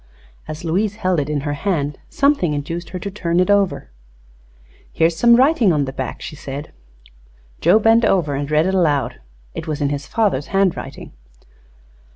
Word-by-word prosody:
As 155 Hz, +2 st, -7 dB
Louise 195 Hz, +5 st, 0 dB
held 185 Hz, -5 st, 0 dB
it 145 Hz, 0 st, -2 dB
in 150 Hz, -2 st, -1 dB
her 145 Hz, 0 st, -2 dB
hand 145 Hz, -3 st, -2 dB
something 280 Hz, -, +2 dB
induced 165 Hz, +4 st, -5 dB
her 185 Hz, -, -5 dB
to 200 Hz, +3 st, -5 dB
turn 175 Hz, -3 st, -1 dB
it 185 Hz, +3 st, +3 dB
over. 195 Hz, -, +1 dB, 1.0 s
"Here 165 Hz, -, +1 dB
is 165 Hz, 0 st, +2 dB
some 235 Hz, +7 st, +5 dB
writing 260 Hz, -3 st, +4 dB
upon 150 Hz, -3 st, +1 dB
the 135 Hz, -, -6 dB
back," 130 Hz, -2 st, -5 dB
she -, -, -7 dB
said. 140 Hz, +1 st, -7 dB, 0.9 s
Joe -, -, +5 dB
bent 225 Hz, +2 st, +4 dB
over 175 Hz, -9 st, +2 dB
and 140 Hz, +1 st, -3 dB
read 155 Hz, +1 st, +3 dB
it 190 Hz, -, 0 dB
aloud. 150 Hz, -, 0 dB, 0.3 s
It -, -, -6 dB
was 155 Hz, -1 st, -3 dB
in 145 Hz, -2 st, 0 dB
his 145 Hz, 0 st, -4 dB
father's 210 Hz, -9 st, 0 dB
handwriting. 195 Hz, -2 st, -2 dB
170 Hz, 180 wpm, -19 LUFS, 145-200 Hz, 1.0 s, some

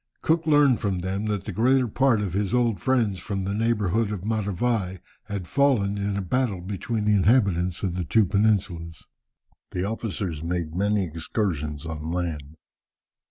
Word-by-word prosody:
Cook 165 Hz, 0 st, +1 dB
learned 145 Hz, -5 st, +5 dB
from 95 Hz, -3 st, -1 dB
them 95 Hz, +3 st, -2 dB
that 105 Hz, -2 st, -1 dB
the -, -, -4 dB
greater 125 Hz, +3 st, +3 dB
part 120 Hz, -1 st, +2 dB
of 95 Hz, -4 st, -3 dB
his 100 Hz, +2 st, 0 dB
old 120 Hz, -6 st, +2 dB
friends 110 Hz, -4 st, +1 dB
from 100 Hz, -2 st, -3 dB
the 100 Hz, +1 st, -2 dB
neighbourhood 110 Hz, -1 st, +1 dB
of 100 Hz, -2 st, -5 dB
Matavai 105 Hz, -2 st, -1 dB, 0.3 s
had 100 Hz, -3 st, -4 dB
fallen 105 Hz, -, +2 dB
in 100 Hz, 0 st, -1 dB
a 100 Hz, -, -2 dB
battle 110 Hz, 0 st, 0 dB
between 105 Hz, +4 st, -3 dB
the 105 Hz, -, +3 dB
inhabitants 95 Hz, -4 st, +2 dB
of 95 Hz, -3 st, 0 dB
the 90 Hz, -, -1 dB
two 110 Hz, +6 st, +3 dB
peninsulas. 95 Hz, -5 st, 0 dB, 0.7 s
The 90 Hz, -, -3 dB
officers 100 Hz, -6 st, -3 dB
made 85 Hz, -1 st, -3 dB
many 100 Hz, +2 st, +1 dB
excursions 80 Hz, -2 st, -3 dB
on 80 Hz, 0 st, -5 dB
land. 80 Hz, -4 st, -3 dB
100 Hz, 160 wpm, -25 LUFS, 90-110 Hz, 0.7 s, learned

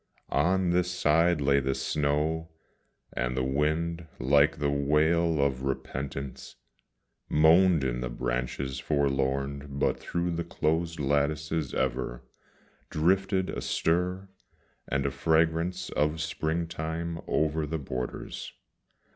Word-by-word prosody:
On 90 Hz, +6 st, +2 dB
this 90 Hz, 0 st, +2 dB
side 85 Hz, -1 st, +3 dB
lay 70 Hz, 0 st, +4 dB
the 65 Hz, 0 st, -1 dB
snow 75 Hz, +3 st, 0 dB, 0.6 s
and 60 Hz, +1 st, -2 dB
the 65 Hz, -, +1 dB
wind, 80 Hz, +5 st, 0 dB
like 70 Hz, +4 st, +3 dB
the 75 Hz, -1 st, 0 dB
wail 75 Hz, +3 st, +2 dB
of 70 Hz, -2 st, +1 dB
repentance, 70 Hz, 0 st, -4 dB, 0.7 s
Moaned 80 Hz, +1 st, +5 dB
in 60 Hz, -2 st, -1 dB
the 60 Hz, -, -2 dB
branches 65 Hz, +2 st, -3 dB
forlorn 70 Hz, 0 st, 0 dB
but 70 Hz, 0 st, 0 dB
through 85 Hz, 0 st, -2 dB
the 85 Hz, 0 st, -2 dB
closed 80 Hz, 0 st, -1 dB
lattices 75 Hz, +2 st, 0 dB
ever 65 Hz, -1 st, -2 dB, 0.7 s
Drifted 95 Hz, +4 st, +1 dB
a -, -, -4 dB
stir 90 Hz, +3 st, 0 dB, 0.6 s
and 70 Hz, -1 st, -1 dB
a 70 Hz, -, +1 dB
fragrance 80 Hz, +5 st, +1 dB
of 75 Hz, +3 st, 0 dB
springtime 80 Hz, +1 st, -2 dB
over 80 Hz, 0 st, +1 dB
the 80 Hz, +2 st, -2 dB
borders. 65 Hz, -4 st, -5 dB
75 Hz, 115 wpm, -28 LUFS, 70-85 Hz, 0.7 s, Moaned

